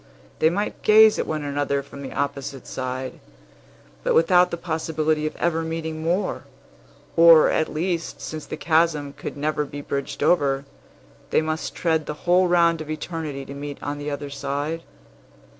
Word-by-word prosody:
They 160 Hz, -, +5 dB
might 200 Hz, +5 st, -3 dB
gaze 215 Hz, 0 st, +6 dB
at -, -, -1 dB
one 155 Hz, -1 st, -2 dB
another 140 Hz, -1 st, -1 dB
from 140 Hz, 0 st, -11 dB
the 135 Hz, -, -6 dB
opposite 140 Hz, -1 st, -3 dB
side, 130 Hz, 0 st, -5 dB, 0.8 s
but -, -, +1 dB
without 180 Hz, +2 st, +5 dB
the 170 Hz, -, -4 dB
possibility 160 Hz, -2 st, -1 dB
of -, -, -6 dB
ever 165 Hz, -1 st, 0 dB
meeting 160 Hz, -1 st, -4 dB
more; 180 Hz, +5 st, -1 dB, 0.7 s
or, 165 Hz, -1 st, +8 dB
at 160 Hz, -, 0 dB
least, 170 Hz, +1 st, -2 dB
since 155 Hz, -1 st, -6 dB
the -, -, -5 dB
chasm 155 Hz, -3 st, +1 dB
could -, -, -7 dB
never 150 Hz, +1 st, 0 dB
be 145 Hz, 0 st, -7 dB
bridged 140 Hz, 0 st, -4 dB
over, 140 Hz, -4 st, +2 dB, 0.6 s
they -, -, +2 dB
must 155 Hz, 0 st, -3 dB
tread 160 Hz, -2 st, 0 dB
the 150 Hz, -, -7 dB
whole 180 Hz, +1 st, +4 dB
round 170 Hz, -2 st, +3 dB
of 155 Hz, -, -8 dB
Eternity 155 Hz, -3 st, -4 dB
to 140 Hz, -, -8 dB
meet 145 Hz, 0 st, -6 dB
on 145 Hz, 0 st, -3 dB
the 145 Hz, 0 st, -4 dB
other 145 Hz, 0 st, -5 dB
side. 145 Hz, +3 st, -3 dB
155 Hz, 165 wpm, -23 LUFS, 145-165 Hz, 0.8 s, or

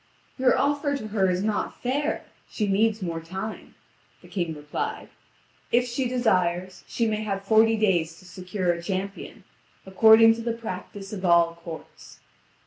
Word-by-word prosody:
"Your 255 Hz, -1 st, +4 dB
offer 285 Hz, 0 st, +1 dB
to 215 Hz, -4 st, -7 dB
her 195 Hz, -3 st, +2 dB
is 180 Hz, +1 st, 0 dB
not 215 Hz, -1 st, -2 dB
fair; 285 Hz, +4 st, -1 dB, 0.2 s
she 215 Hz, -, -2 dB
needs 210 Hz, +1 st, +1 dB
more 165 Hz, -2 st, -3 dB
time," 190 Hz, +6 st, -7 dB, 0.5 s
the -, -, -14 dB
King 170 Hz, -5 st, -3 dB
replied; 150 Hz, 0 st, -5 dB, 0.6 s
"if 245 Hz, +1 st, +3 dB
she 245 Hz, +2 st, -1 dB
desires, 185 Hz, -7 st, 0 dB
she 235 Hz, -, -1 dB
may 215 Hz, -1 st, -1 dB
have 195 Hz, -2 st, -3 dB
forty 225 Hz, +1 st, +4 dB
days 175 Hz, -6 st, +1 dB
to 185 Hz, -, -17 dB
secure 185 Hz, 0 st, -2 dB
a 170 Hz, -, -6 dB
champion, 195 Hz, +2 st, -5 dB, 0.4 s
according 220 Hz, +3 st, +7 dB
to 230 Hz, -, -6 dB
the 230 Hz, 0 st, -1 dB
practice 205 Hz, -2 st, -7 dB
of 195 Hz, -2 st, -6 dB
all 170 Hz, -2 st, +4 dB
courts." 170 Hz, -1 st, -11 dB
200 Hz, 155 wpm, -25 LUFS, 180-225 Hz, 0.6 s, according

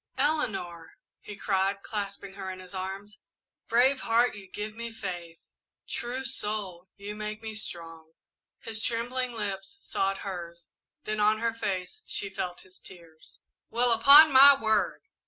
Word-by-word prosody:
"Eleanor!" 205 Hz, -, -1 dB, 0.3 s
he 210 Hz, -, -10 dB
cried, 195 Hz, 0 st, -1 dB
clasping 200 Hz, -2 st, -5 dB
her 195 Hz, -1 st, -7 dB
in 185 Hz, -, -6 dB
his 185 Hz, 0 st, -12 dB
arms. 195 Hz, +2 st, -6 dB, 0.5 s
"Brave 255 Hz, +4 st, +3 dB
heart, 235 Hz, +1 st, +2 dB
you 200 Hz, -2 st, -11 dB
give 210 Hz, +2 st, -6 dB
me 235 Hz, +1 st, -6 dB
faith! 175 Hz, -6 st, -7 dB, 0.5 s
True 250 Hz, +2 st, -4 dB
soul, 205 Hz, -8 st, -4 dB
you 205 Hz, +1 st, -7 dB
make 215 Hz, +1 st, -6 dB
me 220 Hz, -1 st, -5 dB
strong!" 165 Hz, -6 st, -8 dB, 0.5 s
His 220 Hz, -1 st, -4 dB
trembling 245 Hz, +2 st, -2 dB
lips 200 Hz, -3 st, -5 dB
sought 195 Hz, 0 st, -2 dB
hers, 170 Hz, -3 st, -7 dB, 0.3 s
then 215 Hz, 0 st, -3 dB
on 210 Hz, +1 st, +3 dB
her 230 Hz, +1 st, -1 dB
face 200 Hz, -, -4 dB
she 420 Hz, 0 st, -1 dB
felt 180 Hz, -1 st, -5 dB
his 185 Hz, 0 st, -14 dB
tears. 165 Hz, -4 st, -15 dB, 0.3 s
"Well, 245 Hz, +1 st, +2 dB
upon 280 Hz, +7 st, +8 dB
my 275 Hz, +1 st, +10 dB
word!" 220 Hz, -4 st, 0 dB
210 Hz, 145 wpm, -28 LUFS, 185-230 Hz, 0.5 s, my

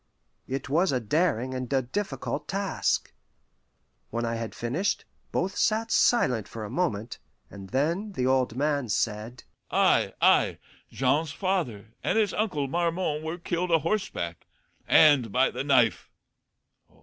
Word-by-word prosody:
It 135 Hz, +1 st, -4 dB
was 170 Hz, +6 st, +2 dB
a 130 Hz, -, +1 dB
daring 130 Hz, 0 st, 0 dB
and 130 Hz, -1 st, -5 dB
a 135 Hz, -1 st, +2 dB
difficult 200 Hz, +12 st, -4 dB
task. 195 Hz, 0 st, -1 dB, 1.0 s
When 115 Hz, +1 st, -2 dB
I 115 Hz, -, -1 dB
had 115 Hz, -1 st, -5 dB
finished, 140 Hz, +12 st, -1 dB, 0.3 s
both 190 Hz, +3 st, -1 dB
sat 225 Hz, +1 st, +1 dB
silent 125 Hz, -, +3 dB
for 110 Hz, -2 st, -7 dB
a 105 Hz, -, -8 dB
moment, 120 Hz, -, -2 dB, 0.3 s
and 95 Hz, -1 st, -10 dB
then 170 Hz, -, -1 dB
the 125 Hz, -8 st, -1 dB
old 130 Hz, -3 st, +2 dB
man 140 Hz, -2 st, 0 dB
said, 110 Hz, +3 st, -2 dB, 0.3 s
"Ay, -, -, +3 dB
ay, -, -, +4 dB, 0.3 s
Jean's 145 Hz, +4 st, +1 dB
father 135 Hz, -, -2 dB
and -, -, +1 dB
his 210 Hz, -3 st, +2 dB
uncle 155 Hz, -10 st, -1 dB
Marmon 170 Hz, 0 st, -1 dB
were 160 Hz, +2 st, -4 dB
killed 175 Hz, +1 st, -2 dB
a 165 Hz, -, +5 dB
horseback, 155 Hz, -, -3 dB, 0.4 s
and 145 Hz, -8 st, +5 dB
by 130 Hz, +4 st, +3 dB
the -, -, -4 dB
knife. 130 Hz, -6 st, +2 dB
140 Hz, 140 wpm, -27 LUFS, 120-180 Hz, 1.0 s, a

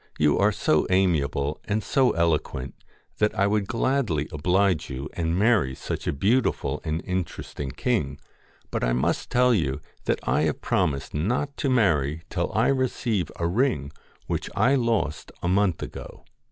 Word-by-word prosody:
'You 75 Hz, -1 st, +3 dB
are 105 Hz, +1 st, +4 dB
so 80 Hz, -6 st, +1 dB
amiable 75 Hz, -6 st, +1 dB
and 105 Hz, 0 st, -1 dB
so 130 Hz, -2 st, +3 dB
eloquent, 75 Hz, -6 st, 0 dB, 0.5 s
that 105 Hz, 0 st, +1 dB
I 100 Hz, -, +3 dB
would 100 Hz, -1 st, +1 dB
gladly 115 Hz, -, 0 dB
oblige 90 Hz, +1 st, +1 dB
you 70 Hz, +1 st, -5 dB
and 85 Hz, 0 st, -1 dB
marry 105 Hz, -, +3 dB
such -, -, -5 dB
a -, -, +2 dB
beautiful 85 Hz, -, +1 dB
and 80 Hz, +1 st, -2 dB
interesting 90 Hz, -6 st, -4 dB
king, 70 Hz, -, -1 dB, 0.5 s
but -, -, -2 dB
I -, -, +2 dB
must 60 Hz, -, 0 dB
tell 125 Hz, 0 st, +4 dB
you 75 Hz, -, 0 dB, 0.3 s
that -, -, +1 dB
I -, -, +2 dB
have -, -, -4 dB
promised 70 Hz, -2 st, -1 dB
not 125 Hz, -, -1 dB
to 140 Hz, -, 0 dB
marry 80 Hz, -, +2 dB
till 85 Hz, -2 st, -1 dB
I 115 Hz, +3 st, +3 dB
receive 120 Hz, -8 st, 0 dB
a 85 Hz, -, -2 dB
ring 85 Hz, -, 0 dB, 0.3 s
which -, -, -3 dB
I 130 Hz, -, +4 dB
lost 115 Hz, -, 0 dB
a -, -, 0 dB
month 95 Hz, -1 st, +2 dB
ago. -, -, -9 dB
90 Hz, 160 wpm, -25 LUFS, 75-115 Hz, 0.5 s, are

